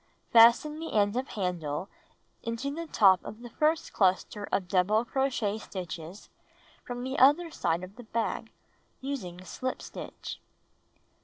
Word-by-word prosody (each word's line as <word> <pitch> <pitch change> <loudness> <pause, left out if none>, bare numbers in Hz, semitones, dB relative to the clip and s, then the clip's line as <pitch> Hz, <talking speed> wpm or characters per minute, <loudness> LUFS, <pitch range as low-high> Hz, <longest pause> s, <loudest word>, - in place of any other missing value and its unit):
Fasten 235 +7 +6
the 325 - -5
end 205 0 +3
of 255 +2 -1
handle 180 -4 -3 0.5
into 230 +4 -3
the 335 +2 -5
top 190 -9 +5
of 215 - -9
the 240 - -9
fii'st 310 +1 +1
cluster 195 +1 +1
of 185 -2 0
double 200 +5 +2
crochet 240 -5 0
stitches 180 -1 -7 0.6
from 245 0 -5
the 265 +2 -2
other 300 +6 +5
side 170 - -1
of 190 +4 -10
the 245 - -9
bag, 225 +1 -2 0.5
using 190 -11 -5
slip 255 +9 -4
stitch. - - -8
220 Hz, 140 wpm, -29 LUFS, 185-265 Hz, 0.6 s, Fasten